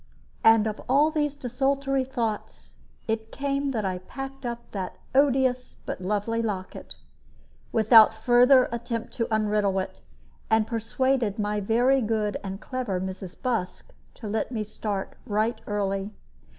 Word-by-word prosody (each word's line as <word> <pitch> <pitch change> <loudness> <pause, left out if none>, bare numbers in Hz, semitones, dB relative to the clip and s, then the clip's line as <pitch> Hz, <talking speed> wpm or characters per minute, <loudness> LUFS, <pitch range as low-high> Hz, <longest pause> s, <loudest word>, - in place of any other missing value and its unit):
And 225 -1 +6
of 215 -1 -3
all 290 +4 +4
these 295 -2 0
desultory 275 +1 0
thoughts 230 -5 -4 0.3
it 220 0 -2
came 280 0 -1
that 225 -6 -2
I 185 -1 -2
packed 270 +6 -7
up 235 0 -6
that 190 -3 -4 0.2
odious 260 -2 +2
but - - -4
very 180 - -6
lovely 210 +3 0
locket, 200 -5 -5 0.8
without 220 0 +7
further 245 +3 +5
attempt 235 -1 -4
to 230 - 0
unriddle 210 -2 +1
it, 185 - -6 0.5
and 220 -1 +3
persuaded 230 0 0
my 210 -1 -1
very 245 +6 +3
good 215 -2 0
and 195 0 -5
clever 250 -8 -3
Mrs. 185 -1 -6
Busk 225 -8 -3 0.2
to 220 - -8
let 220 +4 -2
me 220 -3 -2
start 205 -2 -4
right 220 +1 0
early. 195 -1 -1
225 Hz, 140 wpm, -26 LUFS, 210-255 Hz, 0.8 s, without